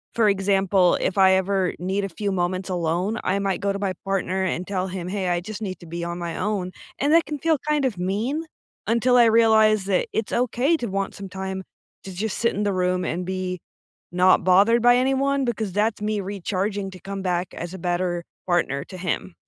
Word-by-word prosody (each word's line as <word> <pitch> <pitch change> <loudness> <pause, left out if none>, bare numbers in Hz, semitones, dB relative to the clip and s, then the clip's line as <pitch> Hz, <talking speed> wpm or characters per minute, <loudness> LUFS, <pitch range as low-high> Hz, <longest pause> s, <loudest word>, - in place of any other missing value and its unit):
For 225 -2 +4
example, 195 -2 +3
if 190 - -1
I 190 0 +6
ever 190 -1 +1
need 190 +3 -1
a 195 - -2
few 200 +3 -3
moments 185 +1 -1
alone, 180 +4 -1
I 190 +2 +1
might 195 0 -1
go 200 0 +1
to 200 - -3
my 195 -2 -1
partner 190 -1 -1
and 185 0 -2
tell 190 -1 -1
him, 180 -1 -5
“Hey, 190 -1 -2
I 175 0 +1
just 215 +4 -7
need 190 -3 -4
to 175 - -13
be 170 +1 -5
on 170 0 -4
my 170 -1 -4
own,” 185 -2 -2 0.3
and 285 +3 +2
that 330 0 +5
can 300 -1 -4
feel 320 +2 +2
kind 300 -2 +2
of 240 -7 -1
mean 220 - -1 0.4
until 240 +2 +3
I 240 - +7
realize 220 -2 +4
that 195 -2 +1
it's 220 - -2
okay 250 +6 +2
to 240 - -4
want 195 0 -2
some 195 -1 -8
time 190 0 -5 0.4
to 195 - -8
just 200 +3 -3
sit 235 - +2
in 205 - -1
the 205 -1 0
room 180 0 0
and 180 +2 -2
be 185 -1 -3 0.5
not 185 +1 +4
bothered 205 +6 +5
by 245 0 +6
anyone 270 +1 +1
because 220 -4 -2
that's 210 +1 0
me 210 0 -1
recharging 195 +1 -3
to 185 - -11
come 195 +1 -6
back 180 -1 -2
as 175 +2 -6
a 190 - -7
better 175 0 -1 0.2
partner 155 -6 +1
to 185 - -10
him. 180 0 -3
195 Hz, 215 wpm, -23 LUFS, 185-215 Hz, 0.5 s, I